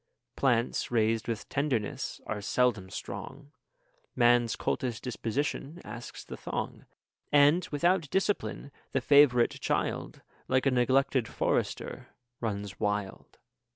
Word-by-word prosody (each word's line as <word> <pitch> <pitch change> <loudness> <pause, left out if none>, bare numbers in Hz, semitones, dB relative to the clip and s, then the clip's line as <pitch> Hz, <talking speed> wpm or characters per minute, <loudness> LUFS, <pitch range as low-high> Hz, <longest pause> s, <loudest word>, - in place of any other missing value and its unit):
Plants 120 -3 +1
raised 115 -1 +1
with 115 -2 -3
tenderness 135 -7 -2
are 105 - -3
seldom 110 -3 +1
strong; 145 +8 -7 0.6
Man's 120 -1 +4
coltish 120 -1 -2
disposition 135 +6 -3
asks 115 +3 -8
the - - -7
thong; - - -5 0.4
And, 145 +5 +5
without 170 +1 +2
discipline, 195 -6 -1 0.2
the 135 - +1
favourite 130 -3 +5
child, - - -2 0.2
Like 130 +1 +2
a 135 - +4
neglected 130 0 +2
forester, - - -2 0.3
runs 100 -4 -4
wild. 105 -2 -3
125 Hz, 110 wpm, -29 LUFS, 115-140 Hz, 0.6 s, And